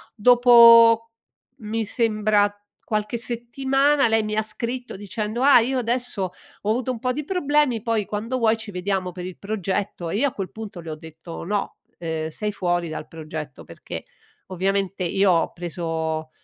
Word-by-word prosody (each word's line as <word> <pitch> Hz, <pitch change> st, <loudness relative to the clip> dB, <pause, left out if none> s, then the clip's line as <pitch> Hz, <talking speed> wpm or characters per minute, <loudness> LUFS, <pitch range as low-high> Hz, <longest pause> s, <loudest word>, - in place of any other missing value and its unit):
Dopo 230 Hz, -1 st, +7 dB, 0.5 s
mi 220 Hz, 0 st, -3 dB
sembra 215 Hz, -2 st, +2 dB, 0.4 s
qualche 215 Hz, +2 st, -1 dB
settimana 270 Hz, +4 st, +1 dB
lei 225 Hz, -1 st, +2 dB
mi 215 Hz, 0 st, -3 dB
ha 215 Hz, -, +2 dB
scritto 240 Hz, +3 st, -4 dB
dicendo: 210 Hz, +4 st, -4 dB
"Ah, 280 Hz, -3 st, +8 dB
io 255 Hz, +3 st, 0 dB
adesso 240 Hz, -4 st, -1 dB, 0.4 s
ho 205 Hz, -, -3 dB
avuto 245 Hz, +3 st, 0 dB
un 235 Hz, -, -5 dB
po' 250 Hz, +1 st, 0 dB
di 300 Hz, +1 st, -4 dB
problemi, 295 Hz, -, +1 dB
poi 225 Hz, -4 st, 0 dB
quando 225 Hz, +5 st, -3 dB
vuoi 225 Hz, -1 st, +3 dB
ci 225 Hz, -2 st, -8 dB
vediamo 185 Hz, 0 st, -2 dB
per 180 Hz, 0 st, -7 dB
il 185 Hz, -1 st, -8 dB
progetto," 200 Hz, -4 st, -3 dB
e -, -, -2 dB
io 285 Hz, +4 st, +3 dB
a -, -, -17 dB
quel 195 Hz, -2 st, -5 dB
punto 215 Hz, -5 st, -8 dB
le 160 Hz, -1 st, -7 dB
ho -, -, -4 dB
detto: 160 Hz, +2 st, -10 dB
"No, 205 Hz, +3 st, -2 dB, 0.2 s
ehm, 160 Hz, -1 st, -3 dB
sei 210 Hz, +6 st, -3 dB
fuori 175 Hz, -3 st, -1 dB
dal 155 Hz, -, -6 dB
progetto 155 Hz, -3 st, -8 dB
perché -, -, -8 dB, 0.4 s
ovviamente 195 Hz, +1 st, -1 dB
io 195 Hz, +2 st, +2 dB
ho 165 Hz, -, +1 dB
preso 160 Hz, -2 st, -3 dB
210 Hz, 170 wpm, -23 LUFS, 180-235 Hz, 0.5 s, Ah